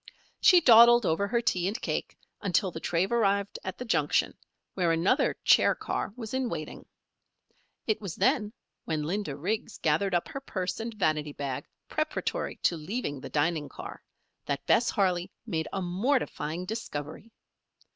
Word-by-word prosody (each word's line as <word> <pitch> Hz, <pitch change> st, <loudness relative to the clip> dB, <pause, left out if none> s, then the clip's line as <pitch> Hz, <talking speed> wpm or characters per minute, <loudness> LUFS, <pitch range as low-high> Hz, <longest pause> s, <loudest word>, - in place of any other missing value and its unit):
She 360 Hz, -2 st, +7 dB
dawdled 240 Hz, -3 st, +8 dB
over 185 Hz, +5 st, +1 dB
her 235 Hz, +3 st, +1 dB
tea 180 Hz, -6 st, 0 dB
and 215 Hz, +6 st, -2 dB
cake -, -, -3 dB, 0.2 s
until 195 Hz, -1 st, +1 dB
the 160 Hz, -, -6 dB
train 175 Hz, +6 st, 0 dB
arrived 200 Hz, -3 st, +1 dB
at 190 Hz, -, -5 dB
the 250 Hz, -, -6 dB
junction, 230 Hz, -, +1 dB, 0.4 s
where 175 Hz, -3 st, +1 dB
another 170 Hz, +10 st, +2 dB
chair -, -, +5 dB
car -, -, -3 dB
was 225 Hz, -2 st, -7 dB
in 260 Hz, -2 st, 0 dB
waiting. -, -, -6 dB, 1.0 s
It 215 Hz, -1 st, 0 dB
was 195 Hz, -6 st, -5 dB
then, 245 Hz, -6 st, +2 dB, 0.3 s
when 155 Hz, -2 st, -1 dB
Linda 170 Hz, -2 st, -2 dB
Riggs 205 Hz, +9 st, -3 dB
gathered 175 Hz, +5 st, +1 dB
up 175 Hz, -, 0 dB
her 275 Hz, -, -5 dB
purse 185 Hz, -8 st, -3 dB
and 230 Hz, +1 st, -4 dB
vanity 155 Hz, -6 st, 0 dB
bag, 140 Hz, -3 st, -4 dB, 0.2 s
preparatory -, -, -2 dB
to 170 Hz, -, +2 dB
leaving 155 Hz, -, -4 dB
the -, -, -7 dB
dining 150 Hz, -1 st, 0 dB
car, -, -, -9 dB, 0.5 s
that 140 Hz, -1 st, -2 dB
Bess 235 Hz, -, +3 dB
Harley 185 Hz, -3 st, +1 dB, 0.2 s
made 160 Hz, -8 st, -2 dB
a 195 Hz, -, -2 dB
mortifying 180 Hz, -, -1 dB
discovery. 185 Hz, -1 st, -6 dB
190 Hz, 155 wpm, -28 LUFS, 160-225 Hz, 1.0 s, dawdled